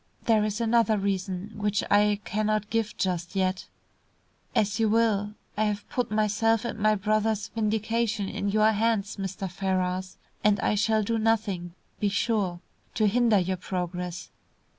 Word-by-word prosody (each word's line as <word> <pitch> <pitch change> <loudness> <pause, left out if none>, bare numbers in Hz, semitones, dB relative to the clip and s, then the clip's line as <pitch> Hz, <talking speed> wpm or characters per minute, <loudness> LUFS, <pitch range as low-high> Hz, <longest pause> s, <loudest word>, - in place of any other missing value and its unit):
There 220 -2 +3
is 210 +1 -2
another 230 -1 +3
reason 195 0 -2
which 210 -1 0
I 205 0 +4
cannot 215 0 -1
give 225 -1 -1
just 180 0 -2
yet." 185 -1 0 0.9
"As 210 +1 +1
you 220 -1 +3
will. 210 -2 +1 0.2
I 215 - +1
have 210 -1 -2
put 250 - -1
myself 215 +2 +1
and 235 - -4
my 215 +1 +3
brother's 215 0 0
vindication 220 -1 -1
in 200 - -2
your 215 +1 +4
hands, 215 -1 0
Mr. 195 0 -4
Ferrars, 185 0 -2 0.3
and 210 0 +4
I - - +2
shall 215 +1 +2
do 225 +2 0
nothing, 200 -6 0 0.2
be 205 - +1
sure, 200 -4 0 0.3
to 215 - +2
hinder 230 +1 +4
your 185 0 0
progress." 180 -1 -4
210 Hz, 150 wpm, -27 LUFS, 195-220 Hz, 0.9 s, I